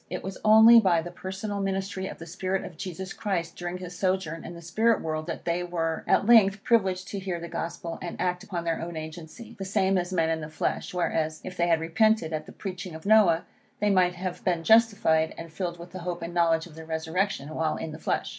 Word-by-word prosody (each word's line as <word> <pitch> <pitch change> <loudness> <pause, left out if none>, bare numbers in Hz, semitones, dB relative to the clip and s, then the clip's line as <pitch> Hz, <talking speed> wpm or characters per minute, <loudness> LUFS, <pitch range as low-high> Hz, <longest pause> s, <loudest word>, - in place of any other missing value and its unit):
It 180 - -5
was 190 0 -6
only 220 +2 +9
by 175 -6 +3
the 175 - -7
personal 190 +3 -5
ministry 195 0 -2
of - - -7
the 165 - -9
spirit 185 +3 -2
of 170 - -9
Jesus 185 +3 -6
Christ, 175 -5 -2
during 175 0 -4
his 180 -1 -8
sojourn 185 -3 -1
in 175 - -8
the - - -9
spirit 220 +7 +2
world, 155 0 -3
that 165 - -5
they 170 +1 0
were 165 -2 -2
at - - +3
length 210 -3 +5
privileged 190 -6 +2
to 200 - -4
hear 185 -2 -3
the 170 - -6
Gospel, 170 0 -5
and 175 - -5
to - - -1
act 180 +1 -1
upon 180 -5 -4
their 165 -1 -1
own 165 0 -5
agency, 160 +7 -9
the - - -3
same 190 -1 +2
as 175 +1 -4
men 165 -3 +1
in 160 0 -1
the 150 - -6
flesh; 155 - -2
whereas, 160 -3 -1
if 185 - -7
they 175 -1 +1
had 165 -2 +3
repented 170 +1 +2
at 155 0 -3
the - - -10
preaching 185 -3 -6
of 160 - -10
Noah, 200 -6 +5 0.3
they 210 0 +2
might 180 -2 +3
have 185 0 -5
been 175 -3 0
justified, 205 -8 +4
and 165 -1 -9
filled 175 +1 -3
with 170 +1 -11
the 185 - -7
hope 175 -1 -4
and 170 +1 -5
knowledge 165 -2 +2
of 175 - -14
the 160 +1 -9
resurrection 160 0 -2
while 160 -1 0
in 160 - -5
the 155 - -8
flesh. - - -1
180 Hz, 240 wpm, -27 LUFS, 165-195 Hz, 0.3 s, only